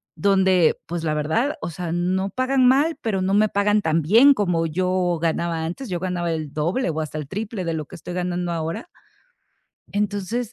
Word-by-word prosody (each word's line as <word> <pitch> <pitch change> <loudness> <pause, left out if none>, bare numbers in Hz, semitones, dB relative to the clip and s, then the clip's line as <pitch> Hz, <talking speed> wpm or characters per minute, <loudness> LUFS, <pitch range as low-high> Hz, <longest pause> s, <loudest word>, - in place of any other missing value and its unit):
donde, 190 -1 +3
pues, 170 -1 -4
la 155 - 0
verdad, 160 - 0
o - - -3
sea, 170 0 -5
no 185 +3 0
pagan 255 +3 +2
mal, 290 +5 +3
pero 200 -5 -1
no 190 +1 0
me 210 +1 +4
pagan 205 +1 +2
tan 160 -1 +1
bien 230 - +6
como 180 -8 0
yo 180 +1 0
ganaba 165 0 -1
antes, 180 +9 -5
yo 175 - -2
ganaba 175 -2 -2
el 155 -3 -4
doble, 170 +10 0
o 160 -1 -2
hasta 155 0 -5
el 150 - -5
triple 210 - -4
de 165 - -1
lo 155 -2 -3
que 185 - -12
estoy 170 +2 -8
ganando 180 -1 -2
ahora 165 +7 -4 1.1
entonces 205 +3 -2
180 Hz, 195 wpm, -22 LUFS, 165-210 Hz, 1.1 s, bien